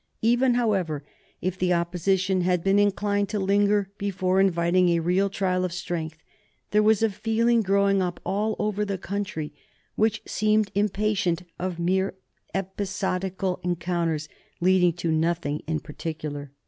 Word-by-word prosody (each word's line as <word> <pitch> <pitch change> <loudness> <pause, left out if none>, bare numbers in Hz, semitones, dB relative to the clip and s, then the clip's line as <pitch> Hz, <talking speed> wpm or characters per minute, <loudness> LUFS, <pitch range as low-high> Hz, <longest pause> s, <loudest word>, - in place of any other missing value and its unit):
Even, 240 +2 +3
however, 190 -11 0 0.4
if 185 0 -2
the 180 -1 +2
Opposition 185 +2 +1
had 180 -1 +1
been 195 +1 +3
inclined 205 0 +1
to 210 - -2
linger 200 0 +2
before 190 -2 +1
inviting 180 -1 +3
a 170 -1 +3
real 180 +4 +1
trial 185 -2 0
of 180 - -1
strength, 165 -2 -4 0.5
there 210 - +4
was 215 0 +3
a 225 - +4
feeling 230 +3 +2
growing 200 -1 +2
up 180 -1 -2
all 210 +2 0
over 210 0 -1
the 200 -2 -2
country 185 -6 -4 0.4
which 220 0 +1
seemed 215 -1 +1
impatient 200 -3 0 0.2
of 180 -1 -3
mere 190 +3 0 0.4
episodical 190 -1 -2
encounters 170 -3 -1 0.3
leading 180 -1 +4
to 170 -1 -2
nothing 160 -2 0
in 160 -1 0
particular. 150 -2 -6
190 Hz, 140 wpm, -25 LUFS, 175-205 Hz, 0.5 s, there